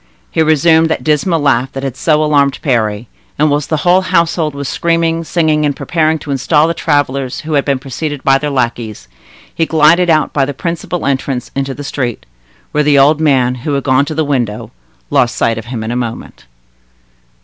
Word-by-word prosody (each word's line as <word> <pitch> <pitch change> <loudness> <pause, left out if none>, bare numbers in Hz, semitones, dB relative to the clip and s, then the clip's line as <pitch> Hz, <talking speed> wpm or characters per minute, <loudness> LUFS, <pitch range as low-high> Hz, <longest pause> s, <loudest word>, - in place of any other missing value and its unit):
He - - +1
resumed 160 +1 +3
that 160 - -2
dismal 155 +3 +1
laugh 135 -3 +1
that 135 - -5
had 135 -2 -3
so 155 +1 +1
alarmed 140 -3 +2
Parry; 110 -4 0 0.3
and 150 0 +2
whilst 145 0 -1
the 155 - +1
whole 180 +1 +5
household 170 -4 0
was 140 -1 -5
screaming, 165 +2 0
singing, 155 -2 +1
and 145 -2 0
preparing 160 0 0
to 150 - -7
install 150 +3 +2
the 165 - 0
travelers 140 -5 -1
who 155 +1 -5
had 140 -1 +1
been 140 -2 +1
preceded 140 +2 -5
by 135 0 +3
their 150 - -2
lackeys, 115 - -3 0.5
he 165 - 0
glided 165 +3 +4
out 155 -2 +2
by 140 - +1
the 140 0 -3
principal 170 +2 -4
entrance 135 -2 -2
into 135 -1 -2
the 145 - -7
street, 130 -4 -4 0.5
where 150 - +1
the 145 -1 +3
old 145 +3 +4
man, 130 -5 +2
who 145 +2 -2
had 140 - -2
gone 135 +1 +2
to 155 - -5
the 160 0 0
window, 120 -7 -2 0.4
lost 120 0 +2
sight 115 -1 0
of 115 - -9
him 120 -2 -5
in 110 - -4
a - - -2
moment. 120 - -6
145 Hz, 200 wpm, -14 LUFS, 130-160 Hz, 0.5 s, whole